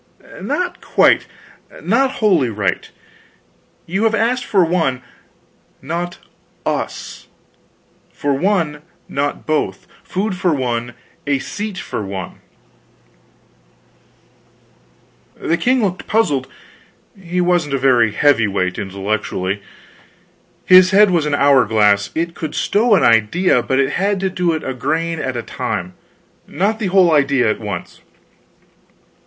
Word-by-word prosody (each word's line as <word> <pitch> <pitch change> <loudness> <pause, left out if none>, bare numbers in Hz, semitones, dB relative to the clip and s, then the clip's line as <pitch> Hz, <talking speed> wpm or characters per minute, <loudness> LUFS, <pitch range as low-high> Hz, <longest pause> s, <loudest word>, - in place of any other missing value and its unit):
"Not 360 0 -3
quite, - - +3 0.5
not 270 0 +1
wholly 180 - +2
right. 105 -3 -2 1.0
You 195 +6 -1
have 225 0 +2
asked 245 +3 0
for 190 -4 +3
one, 160 -7 0 0.8
not 170 +5 -4 0.5
us - - -4 0.8
for 145 -1 -1
one, 160 -2 0 0.3
not 145 +1 -3
both; 155 -1 -2 0.2
food 195 +1 -2
for 180 -3 +1
one, 120 -2 -3 0.3
a 140 -1 +2
seat 205 +7 -5
for 105 - -5
one." 95 -1 -7 3.0
The 165 - 0
king 250 +5 +1
looked 185 -2 -2
puzzled 145 - +1 0.7
he 180 -2 -4
wasn't 175 -5 +1
a - - +1
very 125 -4 +3
heavy 125 -1 +3
weight, 90 -2 -2
intellectually. 100 0 -3 1.0
His 185 0 +7
head 205 +1 +5
was 165 -4 +1
an 145 - +1
hour 140 -2 +5
glass; 105 -2 +2
it 170 +1 -2
could 155 -3 -6
stow 215 +1 +2
an - - +2
idea, 120 - +3
but 130 - -1
it 135 +1 +1
had 200 +3 0
to 190 -1 -1
do 180 -2 0
it 160 - -4
a 130 - -3
grain 165 +6 -2
at 130 -2 -3
a 120 - -4
time, 90 +1 -4 0.5
not 210 +4 -1
the 215 - -1
whole 185 -2 +4
idea 140 -6 +3
at - - -4
once. 105 -3 -6
155 Hz, 125 wpm, -18 LUFS, 120-190 Hz, 3.0 s, His